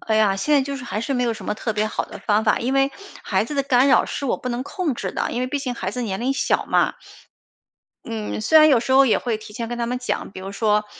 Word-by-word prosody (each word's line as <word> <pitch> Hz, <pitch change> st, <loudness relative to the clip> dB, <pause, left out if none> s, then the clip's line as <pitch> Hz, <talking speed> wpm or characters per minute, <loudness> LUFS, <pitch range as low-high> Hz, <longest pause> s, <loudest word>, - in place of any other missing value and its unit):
哎 220 Hz, -, 0 dB
呀， 210 Hz, -3 st, +3 dB
现 295 Hz, +10 st, +1 dB
在 280 Hz, -, +4 dB
就 280 Hz, +1 st, -4 dB
是 275 Hz, -, -8 dB
还 210 Hz, -, -3 dB
是 270 Hz, +4 st, -2 dB
没 250 Hz, -, +1 dB
有 235 Hz, -1 st, +1 dB
什 225 Hz, -, -9 dB
么 210 Hz, -, -2 dB
特 220 Hz, +1 st, -3 dB
别 210 Hz, 0 st, 0 dB
好 -, -, -2 dB
的 -, -, -10 dB
方 215 Hz, 0 st, +1 dB
法。 -, -, +3 dB
因 250 Hz, +3 st, -1 dB
为 275 Hz, 0 st, +3 dB, 0.3 s
孩 195 Hz, 0 st, 0 dB
子 295 Hz, -, -6 dB
的 275 Hz, -, +1 dB
干 265 Hz, 0 st, +3 dB
扰 -, -, +5 dB
是 280 Hz, -, -4 dB
我 -, -, +1 dB
不 255 Hz, -, -6 dB
能 245 Hz, +1 st, -2 dB
控 325 Hz, -1 st, -2 dB
制 -, -, -4 dB
的， -, -, -2 dB
因 245 Hz, -, -2 dB
为 255 Hz, -, 0 dB
毕 285 Hz, +3 st, -2 dB
竟 260 Hz, -3 st, -3 dB
孩 190 Hz, -4 st, -3 dB
子 250 Hz, +4 st, -4 dB
年 195 Hz, -3 st, -3 dB
龄 255 Hz, +3 st, +1 dB
小 270 Hz, -, 0 dB
嘛。 -, -, +2 dB, 1.1 s
嗯 220 Hz, -1 st, -4 dB
虽 315 Hz, +9 st, +6 dB
然 310 Hz, 0 st, +7 dB
有 260 Hz, -5 st, +5 dB
时 260 Hz, -, -2 dB
候 270 Hz, 0 st, +6 dB
也 225 Hz, -, +4 dB
会 230 Hz, -3 st, -2 dB
提 215 Hz, -1 st, -12 dB
前 230 Hz, 0 st, -4 dB
跟 240 Hz, 0 st, -4 dB
他 235 Hz, -, -1 dB
们 250 Hz, +1 st, -2 dB
讲， 250 Hz, -, -3 dB
比 185 Hz, -, -9 dB
如 195 Hz, +1 st, -7 dB
说， 210 Hz, 0 st, +1 dB
240 Hz, 320 characters per minute, -22 LUFS, 215-270 Hz, 1.1 s, 然